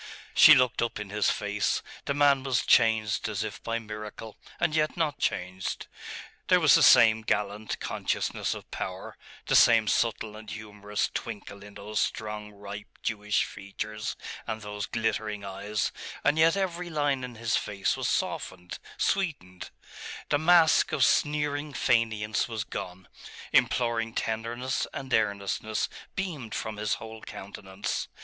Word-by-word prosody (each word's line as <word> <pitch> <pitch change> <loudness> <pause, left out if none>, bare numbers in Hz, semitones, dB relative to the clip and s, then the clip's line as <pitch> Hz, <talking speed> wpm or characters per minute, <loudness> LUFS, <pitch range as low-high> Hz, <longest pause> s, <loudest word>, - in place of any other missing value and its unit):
She - - +9
looked 125 -1 +2
up 115 -2 -1
in 105 -1 -6
his 105 -2 +2
face. 105 0 0 0.2
The 140 - -1
man 140 -2 +4
was 130 -2 0
changed 110 -2 +3
as 105 0 -2
if 110 - -6
by 115 0 -2
miracle 105 0 -8 0.2
and 155 - +1
yet 155 +1 +1
not 155 -4 0
changed. 90 +1 -2 0.6
There - - +5
was - - +6
the - - +6
same 110 -1 +7
gallant 105 0 -2
consciousness - - -2
of - - -11
power, - - -5 0.3
the - - +1
same - - +6
subtle 110 -1 0
and 110 0 -10
humorous 105 -1 -3
twinkle 100 -1 -6
in 105 0 -13
those 105 +1 -3
strong 105 -1 -3
ripe 100 0 -10
Jewish 105 -1 0
features 105 +2 -5 0.3
and 110 -1 -4
those 105 0 -5
glittering 105 -2 -2
eyes; 100 +2 -2 0.3
and 145 +2 +3
yet 165 +4 +5
every 180 -2 -2
line 145 -4 0
in 125 -1 -6
his 115 0 0
face 100 -1 0
was - - -2
softened, 90 -1 -3 0.2
sweetened; 95 - -2 0.6
the 145 - +2
mask 165 0 +5
of 140 -4 +4
sneering 150 0 +1
faineance 110 -4 +1
was 110 -2 -3
gone 90 -4 -7 0.5
imploring 115 -2 +2
tenderness 115 +3 -2
and 135 -3 -5
earnestness 105 0 0 0.3
beamed 155 - -4
from 110 -1 -4
his 105 -1 0
whole 110 0 -9
countenance. 95 0 -5
110 Hz, 145 wpm, -28 LUFS, 105-130 Hz, 0.6 s, She